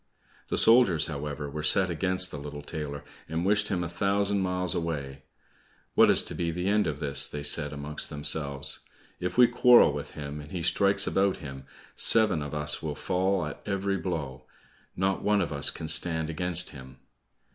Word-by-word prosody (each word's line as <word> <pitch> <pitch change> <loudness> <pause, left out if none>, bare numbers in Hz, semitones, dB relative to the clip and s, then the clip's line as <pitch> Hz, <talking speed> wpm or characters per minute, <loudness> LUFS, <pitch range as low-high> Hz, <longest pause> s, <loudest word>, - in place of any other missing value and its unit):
The - - -2
soldiers, 115 -10 +5
however, 75 -1 -5
were 75 +2 -6
set 95 +4 +3
against 95 +2 0
the 75 - -7
little 75 0 -8
tailor, 75 -2 -6 0.3
and 80 +3 -2
wished 105 +1 +2
him 90 -3 -1
a - - -3
thousand 100 +3 0
miles 90 -2 -1
away. 70 -5 -4 0.7
"What - - +5
is - - +4
to - - -6
be 85 -1 -2
the 90 +3 -3
end 105 -1 +2
of 75 -2 -4
this?" 70 -2 0
they 75 -1 -6
said 75 0 +1
amongst 75 +1 -1
themselves. 75 -1 +1 0.4
"If 90 +5 -4
we 125 - +8
quarrel 120 - +5
with 70 0 -7
him, 75 0 -7
and 75 0 -11
he 90 -3 -4
strikes 100 +3 +2
about 95 0 0
him, 65 -4 -10 0.3
seven 105 -8 +3
of 75 0 -6
us 75 0 +3
will 75 -2 -4
fall 95 +1 -1
at 75 - -8
every 100 0 -1
blow; 75 -8 -5 0.5
not 95 +1 -1
one 105 0 +1
of 85 -5 -2
us 70 - +4
can 80 - -6
stand 80 0 0
against 90 +1 0
him." 65 -2 -12
80 Hz, 185 wpm, -27 LUFS, 75-95 Hz, 0.7 s, we